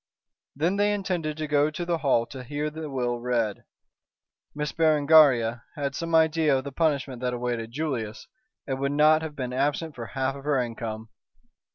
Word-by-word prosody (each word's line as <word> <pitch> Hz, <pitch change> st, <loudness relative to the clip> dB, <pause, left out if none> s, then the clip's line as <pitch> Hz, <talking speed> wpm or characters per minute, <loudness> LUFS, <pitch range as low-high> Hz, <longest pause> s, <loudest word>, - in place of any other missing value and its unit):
Then 170 Hz, +8 st, 0 dB
they 205 Hz, +1 st, +3 dB
intended 175 Hz, -6 st, -2 dB
to 155 Hz, -, -2 dB
go 145 Hz, 0 st, +3 dB
to 170 Hz, +3 st, -5 dB
the 170 Hz, -1 st, 0 dB
Hall 130 Hz, -6 st, +2 dB
to 130 Hz, +2 st, -9 dB
hear 145 Hz, +4 st, -3 dB
the 160 Hz, 0 st, -6 dB
will 120 Hz, -3 st, -2 dB
read. 120 Hz, -4 st, -1 dB, 0.9 s
Miss 150 Hz, 0 st, -2 dB
Berengaria 145 Hz, -7 st, +4 dB
had 140 Hz, -2 st, -2 dB
some 165 Hz, +3 st, -2 dB
idea 160 Hz, -3 st, +4 dB
of 130 Hz, -, -3 dB
the 140 Hz, -, -6 dB
punishment 140 Hz, -4 st, -1 dB
that 125 Hz, -1 st, -1 dB
awaited 120 Hz, -2 st, -3 dB
Julius, 125 Hz, -7 st, -3 dB, 0.4 s
and 135 Hz, -1 st, -3 dB
would 140 Hz, +1 st, -1 dB
not 155 Hz, +2 st, +5 dB
have 160 Hz, -2 st, -6 dB
been 125 Hz, -2 st, -4 dB
absent 145 Hz, +4 st, -1 dB
for 120 Hz, -3 st, -7 dB
half 135 Hz, 0 st, -2 dB
of 140 Hz, -, -10 dB
her 145 Hz, -2 st, +1 dB
income. 115 Hz, -2 st, -4 dB
140 Hz, 180 wpm, -26 LUFS, 125-155 Hz, 0.9 s, not